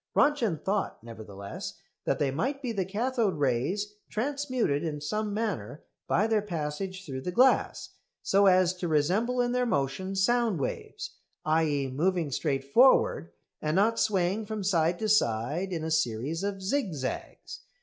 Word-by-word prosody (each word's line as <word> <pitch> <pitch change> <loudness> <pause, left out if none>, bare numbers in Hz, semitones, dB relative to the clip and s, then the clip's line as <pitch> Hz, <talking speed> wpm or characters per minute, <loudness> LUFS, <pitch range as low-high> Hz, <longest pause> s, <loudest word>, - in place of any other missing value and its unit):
Röntgen 245 - +2
thought, 195 - -1
nevertheless, 105 -4 -8 0.3
that - - +1
they 140 -2 +1
might 270 - -2
be 245 - -1
the 195 -4 -1
cathode 220 0 0
rays 155 - -1
transmuted 255 - -1
in 155 -3 -3
some 210 +8 -2
manner 195 - -3 0.2
by 205 - +2
their 220 -1 +2
passage 185 +1 -4
through 130 -3 -5
the 180 - -3
glass, 255 +8 +3 0.3
so 200 +1 +4
as 185 -1 +5
to 180 - -3
resemble 185 +11 +1
in 245 0 0
their 250 0 +1
motion 185 - -1
sound 225 -1 +2
waves, 135 - -5 0.3
i.e. 155 -3 +2
moving 160 +4 0
straight 135 0 -1
forward 140 - +4 0.3
and 155 +1 0
not 220 +4 +3
swaying 200 0 +1
from 215 -2 -4
side 175 -2 +2
to 215 - -2
side 155 - +1
in 165 -3 -3
a 160 - -3
series 150 +1 0
of 195 -1 -3
zig 200 - 0
zags. 130 -2 -5
185 Hz, 155 wpm, -28 LUFS, 150-215 Hz, 0.3 s, as